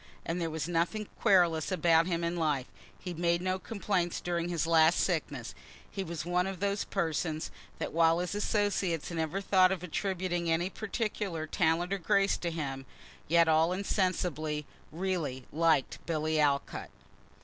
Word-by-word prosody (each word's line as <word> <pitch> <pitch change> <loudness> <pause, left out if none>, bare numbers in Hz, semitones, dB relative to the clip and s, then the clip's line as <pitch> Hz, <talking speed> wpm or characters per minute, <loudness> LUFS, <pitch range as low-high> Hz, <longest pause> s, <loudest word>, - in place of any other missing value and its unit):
As 165 +2 -2
there 165 -1 -1
was 160 0 -3
nothing 175 +5 -1
querulous 175 -3 +3
about 165 -1 +4
him 170 -2 -1
in 170 +1 -1
life, 150 -6 0 0.3
he 180 - -6
made 170 +1 +1
no 185 +1 -1
complaints 190 -4 -1
during 175 -1 -2
his 170 -3 0
last 165 0 +5
sickness. 145 -8 -1 0.4
He 195 - -3
was 170 -2 -5
one 180 +1 +1
of 195 -2 -5
those 200 +1 0
persons 160 -3 -2 0.3
that - - -4
while 165 0 +4
his 180 +2 -2
associates 205 -6 0
never 165 +3 -2
thought 185 -2 +4
of 185 -2 -2
attributing 180 -1 -2
any 170 +3 +1
particular 205 -6 -3
talent 170 +2 +1
or 200 - -1
grace 200 +2 +2
to 175 - -3
him, 135 -5 -4 0.4
yet 170 +1 +5
all 160 +2 +4
insensibly, 180 -6 -1 0.3
really, 160 -7 -2
liked 160 -3 +1
Billy 155 -1 0
Alcott. 140 -2 0
170 Hz, 155 wpm, -30 LUFS, 160-185 Hz, 0.4 s, last